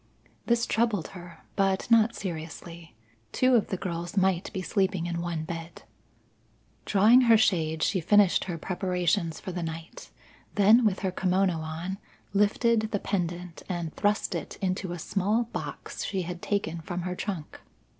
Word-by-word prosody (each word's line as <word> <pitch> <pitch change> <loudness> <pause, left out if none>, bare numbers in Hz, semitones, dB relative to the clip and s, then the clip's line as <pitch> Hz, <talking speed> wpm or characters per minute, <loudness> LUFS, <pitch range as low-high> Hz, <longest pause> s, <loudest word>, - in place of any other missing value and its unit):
This 235 0 +3
troubled 220 -7 0
her, 175 -2 -12
but 195 -1 +1
not 230 0 +5
seriously. 165 - -7 0.4
Two 255 - +3
of 230 -4 +4
the 190 - -2
girls 175 +1 -4
might 190 -2 +2
be 190 -3 -4
sleeping 190 -3 0
in 170 -1 -2
one 170 -2 -3
bed. 165 0 -7 1.0
Drawing 215 +6 +6
her 230 -3 +6
shade, 160 -7 +1
she 190 - +2
finished 205 +2 +4
her 175 -3 -4
preparations 180 -1 -1
for 190 - -6
the 175 0 -4
night; 160 0 -7 0.5
then 215 +4 +6
with 200 -3 +1
her 190 -1 0
kimono 185 0 +1
on, 165 +5 -5 0.3
lifted 220 +2 +2
the 210 - 0
pendant 175 -3 -3
and 170 -3 -3
thrust 205 0 +1
it - - -5
into 185 -1 -2
a 175 - -4
small 205 +7 0
box - - -5
she 190 -2 -2
had 175 0 -6
taken 170 -5 -2
from 175 +3 -4
her 180 0 -2
trunk. 180 -5 -5
185 Hz, 155 wpm, -28 LUFS, 170-205 Hz, 1.0 s, Drawing